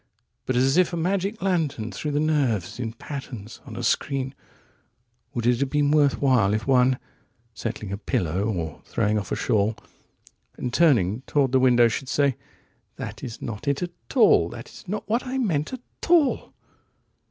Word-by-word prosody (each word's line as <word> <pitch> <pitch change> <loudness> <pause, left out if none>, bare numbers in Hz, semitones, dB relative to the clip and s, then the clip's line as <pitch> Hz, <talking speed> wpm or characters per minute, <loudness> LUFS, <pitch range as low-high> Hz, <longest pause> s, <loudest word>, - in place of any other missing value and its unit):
105But 130 - 0
as 135 +5 +3
if 180 -1 +4
a - - -1
magic 195 +4 -1
lantern 155 - 0
threw 150 +10 -4
the 145 0 0
nerves 135 - 0
in 115 -2 -3
patterns 120 -4 -8
on - - -8
a - - -5
screen:106Would 125 -3 -5
it 120 0 +3
have 140 - 0
been 145 0 +2
worth 145 -2 +4
while107If 110 -6 +2
one, 130 -1 +4 0.6
settling 110 -2 -5
a 100 - -4
pillow 90 -1 -1
or 85 -8 -3
throwing 105 +1 0
off 100 - -7
a - - +1
shawl,108And 110 +2 -4
turning 120 - +3
toward 140 -3 +2
the 130 - +4
window, 120 -2 +5
should 125 +3 -3
say:109 140 -2 +2 0.6
"That - - -7
is 120 -4 -7
not 115 +5 -6
it 140 +3 +1
at 175 - -4 0.2
all,110 245 - +5
That - - -10
is - - -14
not 210 +3 -4
what 235 +4 0
I 260 +1 -2
meant, 165 - 0
at 260 -2 -6 0.3
all." 330 -6 +3
130 Hz, 165 wpm, -25 LUFS, 115-155 Hz, 0.6 s, window